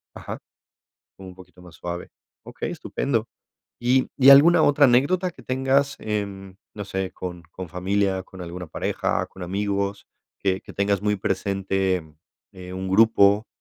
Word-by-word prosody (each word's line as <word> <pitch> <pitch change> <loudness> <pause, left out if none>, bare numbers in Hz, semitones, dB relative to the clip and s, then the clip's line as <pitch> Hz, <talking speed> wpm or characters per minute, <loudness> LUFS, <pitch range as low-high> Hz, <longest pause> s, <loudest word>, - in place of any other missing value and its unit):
Ajá. - - -7 0.8
Un 95 -1 -10
poquito 90 0 -16
más 90 -2 -14
suave. 85 +2 -6 0.4
Okey, - - -5
estupendo. 115 -5 -2 0.5
Y 125 +2 +2
y, 135 -1 +7
¿alguna 150 +5 +7
otra 145 0 +5
anécdota 170 +9 +2
que - - -16
tengas 135 +2 +1
en, 100 -3 -4 0.2
no 105 - -6
sé, 95 -1 -3
con 90 -2 -7
con 95 0 -8
familia, 95 +2 0
con 95 0 -12
alguna 90 0 -7
pareja, - - -1
con 95 - -10
amigos, 100 +2 -2 0.3
que 95 -1 0
que - - -12
tengas 100 -1 0
muy 105 0 +1
presente, 95 -1 -1 0.5
eh, 90 -1 -9
un 95 0 -4
grupo 105 0 +4
100 Hz, 145 wpm, -24 LUFS, 95-115 Hz, 0.8 s, y